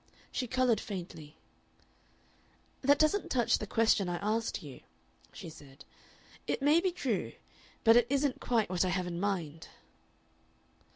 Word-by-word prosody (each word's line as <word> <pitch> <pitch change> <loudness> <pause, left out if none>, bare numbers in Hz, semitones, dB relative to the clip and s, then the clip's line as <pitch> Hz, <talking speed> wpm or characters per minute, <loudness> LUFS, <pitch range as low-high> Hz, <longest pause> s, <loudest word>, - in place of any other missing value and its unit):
She 250 - -2
colored 255 -2 +2
faintly. 170 -6 -8 1.4
"That 280 +2 +4
doesn't 310 +7 +1
touch 240 -3 +2
the 210 - -5
question 220 -3 +2
I 175 - -2
asked 220 0 -2
you," 140 -4 -10 0.5
she - - -9
said. 145 -3 -13 0.6
"It - - -1
may 295 +4 +4
be 370 0 +1
true, 255 - -2 0.5
but 225 0 +7
it 240 -1 +5
isn't 280 -1 0
quite 230 -3 +1
what 180 0 +1
I 185 - 0
have 185 0 -1
in 175 -1 -4
mind." 175 -6 -3
215 Hz, 140 wpm, -31 LUFS, 175-255 Hz, 1.4 s, but